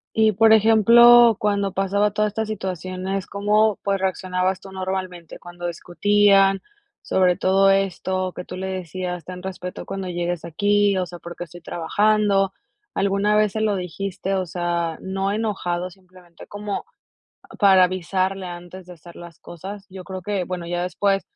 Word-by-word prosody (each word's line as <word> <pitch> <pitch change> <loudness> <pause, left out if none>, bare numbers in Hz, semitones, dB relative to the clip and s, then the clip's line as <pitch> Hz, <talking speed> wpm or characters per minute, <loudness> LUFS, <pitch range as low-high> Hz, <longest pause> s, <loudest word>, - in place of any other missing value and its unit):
Y, 220 -1 +4
por 220 +3 +5
ejemplo, 230 +1 +7
cuando 200 -2 0
pasaba 200 +2 +1
toda 210 +1 +1
esta 220 +2 -3
situaciones, 190 -2 -4
¿cómo, 210 +1 +2
pues, 200 0 0
reaccionabas 185 0 -1
tú 195 - -12
normalmente 185 -3 -5
cuando 175 0 -7
discutían?, 195 +3 +3 0.4
sobre 185 -1 +2
todo 195 +1 +4
esto 185 -1 -1
que 180 - -6
tú 180 - -8
le 190 +1 -4
decías: 180 -1 -5
"Ten 180 0 -8
respeto 180 -1 -7
cuando 195 -1 -5
llegues 175 -1 -3
aquí, 205 +3 +2
o 185 - 0
sea, 175 - -9
porque 170 0 -10
qué - - -3
estoy 175 +1 -13
trabajando". 200 +3 +1 0.4
¿Alguna 200 +1 +1
vez 215 -2 +2
se 220 - -2
lo 215 -2 +1
dijiste? 190 +2 -4
O 190 -1 -1
sea, 170 -1 -2
no 195 +1 -2
enojado, 185 -5 -2
simplemente 180 -2 -17
como 205 0 -5 0.8
para 190 -3 +6
avisarle 185 +1 -2
antes 175 +1 -9
de 180 - -11
hacer 170 +1 -15
las 170 -2 -12
cosas. 195 +4 -9
Yo 185 0 -9
creo 185 0 -6
que, 200 0 -2
bueno, 180 -1 -5
ya 175 +1 -2
después 195 +2 0
190 Hz, 160 wpm, -22 LUFS, 180-200 Hz, 0.8 s, ejemplo